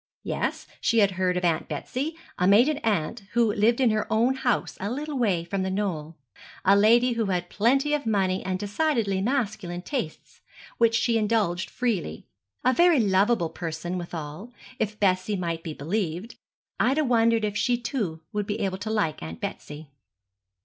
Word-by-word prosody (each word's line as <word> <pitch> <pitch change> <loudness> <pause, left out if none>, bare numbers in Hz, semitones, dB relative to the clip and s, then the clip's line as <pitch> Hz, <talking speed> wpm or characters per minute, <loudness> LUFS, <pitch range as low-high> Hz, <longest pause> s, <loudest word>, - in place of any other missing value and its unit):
Yes, - - -2 0.2
she 230 - +2
had 200 -3 +5
heard 185 -1 0
of 180 - -1
Aunt 165 -2 +1
Betsy 260 - -4 0.2
a 180 - +3
maiden 245 +10 +5
aunt, 215 - -1
who 230 -3 +3
lived 225 +4 +2
in 250 -4 +4
her 215 0 -1
own 235 +4 +3
house 260 -2 -1
a 200 - -2
little 290 +5 -4
way 200 -10 +1
from 190 +3 -3
The 190 - -1
Knoll. 175 -6 -3 0.5
A 195 +2 +6
lady 235 +5 +5
who 230 -2 0
had 180 -2 -2
plenty 270 +7 +2
of 290 -5 -1
money 190 -3 +1
and 185 0 -2
decidedly 205 -1 0
masculine 205 -7 -2
tastes, 245 - -5 0.4
which 230 -1 +4
she 230 0 +2
indulged 210 -5 0
freely; 205 - -2 0.4
a 255 - +5
very 340 -1 +5
lovable 195 -3 +2
person 170 +2 -4
withal, 170 +5 -7 0.3
if 215 -1 -2
Bessie 190 +1 +1
might 170 -2 -3
be 160 -2 -6
believed. 180 - -3 0.4
Ida 280 +5 +3
wondered 230 -3 +3
if 205 -1 -3
she 240 +4 +1
too 230 - -3
would 210 -1 -2
be 205 - -2
able 190 -1 -1
to 215 - -4
like 210 -8 0
Aunt 80 +1 -7
Betsy. 150 0 -7
205 Hz, 170 wpm, -26 LUFS, 180-235 Hz, 0.5 s, A